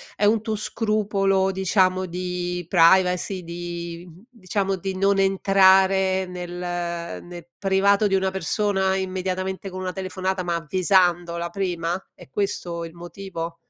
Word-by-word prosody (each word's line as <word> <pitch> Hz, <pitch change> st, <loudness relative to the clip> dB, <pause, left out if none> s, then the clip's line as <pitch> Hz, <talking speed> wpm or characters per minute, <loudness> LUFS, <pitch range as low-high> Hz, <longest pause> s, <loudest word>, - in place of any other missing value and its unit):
è 205 Hz, -, +1 dB
un 215 Hz, +1 st, +3 dB
tuo 220 Hz, -1 st, -2 dB
scrupolo 200 Hz, -3 st, 0 dB
diciamo 185 Hz, -1 st, +1 dB
di 180 Hz, 0 st, -3 dB
privacy, 180 Hz, +2 st, +3 dB
di 170 Hz, 0 st, -6 dB, 0.2 s
diciamo, 195 Hz, -5 st, -2 dB
di 190 Hz, +1 st, -4 dB
non 195 Hz, +1 st, +2 dB
entrare 190 Hz, -1 st, +4 dB
nel 180 Hz, -1 st, -7 dB
ehm, 175 Hz, -1 st, -4 dB
nel 175 Hz, -1 st, -9 dB
privato 200 Hz, +1 st, +3 dB
di 195 Hz, -, +1 dB
una 190 Hz, 0 st, +1 dB
persona 190 Hz, +1 st, 0 dB
immediatamente 190 Hz, 0 st, -3 dB
con 185 Hz, 0 st, -6 dB
una 185 Hz, -, -2 dB
telefonata, 190 Hz, 0 st, -3 dB
ma 175 Hz, -1 st, -1 dB
avvisandola 175 Hz, 0 st, +1 dB
prima? 175 Hz, -3 st, -2 dB, 0.2 s
È 175 Hz, -, -14 dB
questo 175 Hz, 0 st, -3 dB
il 165 Hz, 0 st, -11 dB
motivo? 170 Hz, -1 st, -7 dB
185 Hz, 130 wpm, -23 LUFS, 175-195 Hz, 0.2 s, entrare